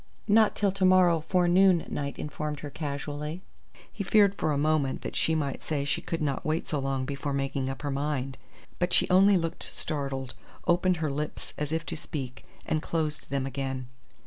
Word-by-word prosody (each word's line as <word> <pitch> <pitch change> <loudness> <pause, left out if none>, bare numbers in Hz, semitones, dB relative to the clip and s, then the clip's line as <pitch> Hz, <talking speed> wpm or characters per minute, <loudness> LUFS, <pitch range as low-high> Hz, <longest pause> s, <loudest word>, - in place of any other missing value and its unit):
"Not 215 0 +5
till 200 -2 +2
to 195 0 -3
morrow 185 -3 +6
forenoon," 180 +1 +4
Knight 140 -1 -3
informed 150 0 -4
her 145 - -6
casually. 150 +3 -4 0.5
He 205 - -3
feared 200 0 +5
for 155 - -1
a 145 - +1
moment 150 -2 +1
that - - -5
she 160 - +2
might 140 -3 -2
say 145 -3 -2
she 145 - 0
could 165 -2 -3
not 140 -3 -1
wait 160 0 -1
so 150 - -1
long 135 -1 -1
before 140 +1 -3
making 135 -1 -1
up 135 +2 -6
her 145 - -1
mind; 135 -1 -2 0.4
but 175 0 +1
she - - +4
only 195 +2 +6
looked 165 0 -3
startled, 135 -4 -3 0.3
opened 180 +1 +3
her 155 -2 -1
lips 150 +2 -4
as 150 0 -3
if 160 0 -1
to - - -4
speak, 135 -5 -5 0.2
and 155 - 0
closed 155 -2 -2
them 135 -1 -1
again. 135 -1 -3
150 Hz, 190 wpm, -28 LUFS, 140-175 Hz, 0.5 s, morrow